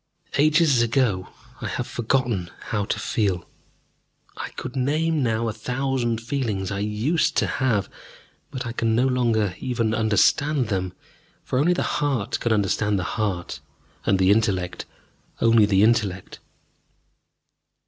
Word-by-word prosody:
Ages 155 -3 +4
ago 115 -6 +1 0.3
I - - -3
have - - -3
forgotten 120 -6 -1 0.2
how 105 -3 0
to - - -2
feel. 95 -6 -1 0.9
I - - -5
could 130 +1 -6
name 155 +4 +1
now 115 -2 0
a 110 - -2
thousand 125 0 -1
feelings 115 -7 -2
I 100 - -2
used 105 +11 0
to - - +3
have, 120 -7 0 0.6
but 130 -2 -5
I 120 - -3
can 115 -1 0
no 125 +3 +3
longer 115 -7 +1
even 115 -3 -1
understand 115 - +2
them. 95 -3 -2 0.5
For 130 - -1
only 170 +5 +3
the - - -1 0.2
heart 135 -8 0
can 120 - -1
understand 105 0 +1
the 90 - -1
heart, 95 -5 -2 0.4
and 100 - +2
the 95 +1 +4
intellect 100 -5 0 0.5
only 115 -2 +5
the 100 -1 +3
intellect. 105 -5 0
115 Hz, 140 wpm, -24 LUFS, 100-130 Hz, 0.9 s, only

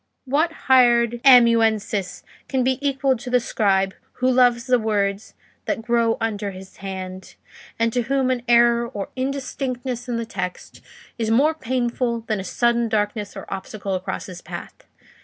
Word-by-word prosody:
"What 300 +6 +1
hired 240 -2 +4
amanuensis 225 -6 +4 0.3
can 260 -2 +1
be 260 +1 +1
equal 275 -1 +1
to 245 +2 -8
the 250 0 +3
scribe 195 -4 +1 0.2
who 255 +1 +1
loves 245 -2 +3
the 250 -1 +3
words 205 -2 -1 0.3
that 225 - -2
grow 235 -1 +1
under 210 -2 -2
his 190 0 -11
hand, 190 -1 -7 0.4
and 230 0 +1
to 245 - +1
whom 265 +1 0
an 250 -1 -1
error 235 0 +4
or 205 -5 -6
indistinctness 260 -2 -4
in 235 - -1
the 230 - -3
text 180 -5 -6 0.4
is 225 -1 -1
more 280 +8 +4
painful 245 -3 -2
than 220 -2 -2
a - - -4
sudden 235 +2 +1
darkness 210 -1 -2
or 195 - -7
obstacle 195 +1 -5
across 185 0 -4
his 180 -2 -9
path? - - -8
235 Hz, 155 wpm, -22 LUFS, 210-255 Hz, 0.4 s, hired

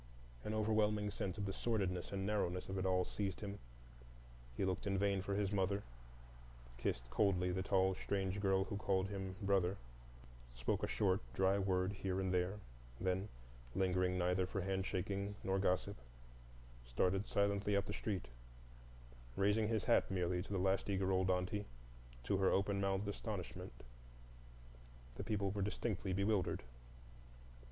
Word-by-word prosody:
An 105 - -2
overwhelming 105 -1 +2
sense 95 +1 -3
of 100 - -2
the 95 - -2
sordidness 95 -6 -1
and 95 -1 -2
narrowness 95 -4 0
of 95 0 -2
it 95 - +1
all 90 -1 +3
seized 100 -2 -3
him; 100 -1 -5 1.0
he - - +1
looked 95 +2 -1
in 100 -1 +1
vain 100 0 +2
for 100 +1 -2
his 100 -1 +1
mother, 100 0 +1 0.9
kissed 60 +1 -2
coldly 90 +3 +2
the 95 +1 0
tall, 95 -1 +3
strange 95 +1 -1
girl 95 -1 +3
who 100 +1 -4
called 95 -2 +1
him 95 -2 -4
brother, 95 -1 +2 0.8
spoke 60 - 0
a - - 0
short, 95 -3 +2
dry 95 +1 +3
word 95 0 +1
here 95 -1 -2
and 95 -1 0
there; 90 +3 +1 0.4
then, 95 +3 0 0.5
lingering 90 -1 +2
neither 90 +1 +2
for 95 +1 -2
handshaking 95 +1 -1
nor 95 0 +1
gossip, 95 +1 +1 0.9
started 90 - +1
silently 100 0 +2
up 100 0 +2
the - - -4
street, 100 -5 -2 1.1
raising 105 +2 +3
his 110 -3 +1
hat - - +4
merely 90 -1 0
to 100 - -8
the 100 - +1
last 95 +2 +1
eager 95 -1 +1
old 95 0 +2
aunty, 95 +3 0 0.6
to 100 - +1
her 95 0 +4
open 100 0 +2
mouthed 100 +1 0
astonishment. 100 -3 -5 1.3
The - - -5
people 100 -2 0
were 100 0 -2
distinctly 105 -1 -1
bewildered. 100 0 +1
95 Hz, 150 wpm, -38 LUFS, 95-100 Hz, 1.3 s, hat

